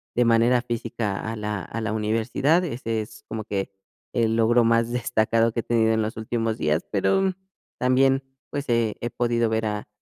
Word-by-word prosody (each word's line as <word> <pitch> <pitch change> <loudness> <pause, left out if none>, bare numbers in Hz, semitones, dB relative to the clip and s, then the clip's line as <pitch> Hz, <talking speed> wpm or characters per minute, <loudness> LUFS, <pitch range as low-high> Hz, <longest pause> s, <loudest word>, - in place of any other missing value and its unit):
de 120 - +3
manera 115 +2 +4
física 115 -4 -3
a 110 +1 -4
la 105 -2 -3
a 115 - -5
la 110 -1 -2
universidad. 115 +10 +1
Ese 115 -8 -2
es 110 0 -11
como 110 -1 -4
que 100 -2 -3 0.4
el 115 -1 +2
logro 115 +1 +4
más 115 0 +2
destacado 115 -1 +1
que 115 - -3
he - - -20
tenido 110 -1 +2
en 110 - +1
los 110 +1 -3
últimos 115 0 -2
días. 75 +1 0
Pero, 190 - +2
mm, 190 -1 +1 0.5
también, 135 +1 +3 0.3
pues, 140 -1 -4
he 115 -2 +1
he 120 - -2
podido 120 -1 0
ver 110 0 0
a 105 -1 -3
115 Hz, 190 wpm, -24 LUFS, 110-120 Hz, 0.5 s, manera